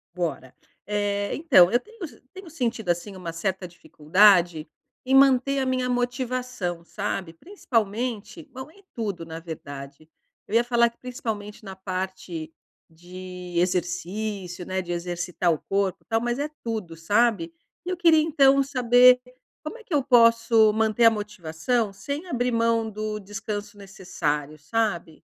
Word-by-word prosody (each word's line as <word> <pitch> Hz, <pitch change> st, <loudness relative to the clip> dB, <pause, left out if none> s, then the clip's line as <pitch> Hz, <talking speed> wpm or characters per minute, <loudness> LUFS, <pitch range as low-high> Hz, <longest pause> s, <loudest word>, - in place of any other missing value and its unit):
Bora, 165 Hz, -7 st, -3 dB, 0.3 s
eh 205 Hz, -1 st, -1 dB
então, 185 Hz, -, +5 dB
eu 240 Hz, -, +3 dB
tenho 420 Hz, -, -9 dB
se -, -, -16 dB
eu -, -, -24 dB
tenho 380 Hz, -2 st, -10 dB
sentido 235 Hz, -, -3 dB
assim 175 Hz, +4 st, -1 dB
uma 180 Hz, -3 st, -6 dB
certa 185 Hz, +2 st, -3 dB
dificuldade, 170 Hz, 0 st, +3 dB, 0.4 s
em 265 Hz, +1 st, +2 dB
manter 275 Hz, 0 st, +5 dB
a 265 Hz, -, 0 dB
minha 255 Hz, -1 st, 0 dB
motivação, 245 Hz, -7 st, -2 dB
sabe? 190 Hz, -2 st, -4 dB
Principalmente, 235 Hz, -, -3 dB
bom 260 Hz, +2 st, -9 dB
em 400 Hz, +4 st, -21 dB
tudo 200 Hz, -8 st, -4 dB
na 160 Hz, 0 st, -7 dB
verdade. 145 Hz, -2 st, -9 dB, 0.4 s
Eu 215 Hz, -, -3 dB
ia 235 Hz, -, +5 dB
falar 235 Hz, -1 st, +3 dB
que 235 Hz, -, -29 dB
principalmente 220 Hz, -5 st, -6 dB
na 190 Hz, -1 st, -8 dB
parte 185 Hz, -3 st, -5 dB, 0.4 s
de 180 Hz, +2 st, -10 dB
exercício, 180 Hz, +1 st, -2 dB
né, 185 Hz, 0 st, -2 dB
de 175 Hz, -, -7 dB
exercitar 175 Hz, 0 st, -1 dB
o 155 Hz, -, -4 dB
corpo 195 Hz, -1 st, -1 dB
e -, -, -46 dB
tal, 225 Hz, 0 st, +1 dB
mas 240 Hz, +2 st, -2 dB
é 295 Hz, +1 st, -2 dB
tudo, 215 Hz, -8 st, -4 dB
sabe? 205 Hz, -1 st, +1 dB, 0.3 s
E -, -, -4 dB
eu 370 Hz, -, 0 dB
queria 330 Hz, -2 st, +5 dB
então 275 Hz, -3 st, +4 dB
saber, 250 Hz, -1 st, +5 dB, 0.4 s
como 355 Hz, +10 st, -6 dB
é 460 Hz, -, -15 dB
que 380 Hz, -, -8 dB
eu 290 Hz, -, +3 dB
posso 230 Hz, -3 st, +5 dB
manter 220 Hz, +1 st, +2 dB
a 230 Hz, -, +8 dB
motivação 210 Hz, +1 st, -2 dB
sem 285 Hz, -, -5 dB
abrir 250 Hz, -7 st, -1 dB
mão 230 Hz, -1 st, +1 dB
do 215 Hz, 0 st, -4 dB
descanso 205 Hz, +1 st, -6 dB
necessário, 155 Hz, -6 st, -4 dB
sabe? 170 Hz, -1 st, -2 dB
210 Hz, 155 wpm, -25 LUFS, 180-245 Hz, 0.4 s, a